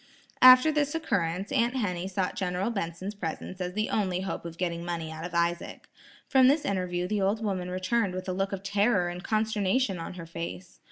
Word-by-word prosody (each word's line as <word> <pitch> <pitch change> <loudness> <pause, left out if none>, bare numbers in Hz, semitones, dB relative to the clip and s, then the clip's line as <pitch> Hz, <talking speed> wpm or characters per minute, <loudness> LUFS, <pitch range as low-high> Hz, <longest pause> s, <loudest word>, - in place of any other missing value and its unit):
After 255 +4 +9
this 295 0 0
occurrence, 190 - -1
Aunt 235 +2 +1
Henny 185 -7 -1
sought 190 -1 -2
General 185 +3 -1
Benson's 190 -1 -4
presence 185 0 -5
as 180 0 -3
the 215 +2 -1
only 185 -4 0
hope 190 -2 -4
of 165 -1 -7
getting 170 -1 -2
money 170 -2 -4
out 160 0 -7
of 175 0 -6
Isaac. 170 0 -1 0.4
From 260 -2 +5
this 290 +3 +3
interview 180 -2 -1
the 210 +1 -1
old 205 +3 +1
woman 185 -4 -2
returned 185 +2 0
with 185 - -5
a 185 - -1
look 195 +1 -1
of 195 -1 -5
terror 200 -2 +2
and 175 +1 -7
consternation 215 -1 0
on 165 - -6
her 170 -2 -7
face. 170 +2 -7
185 Hz, 200 wpm, -28 LUFS, 175-215 Hz, 0.4 s, After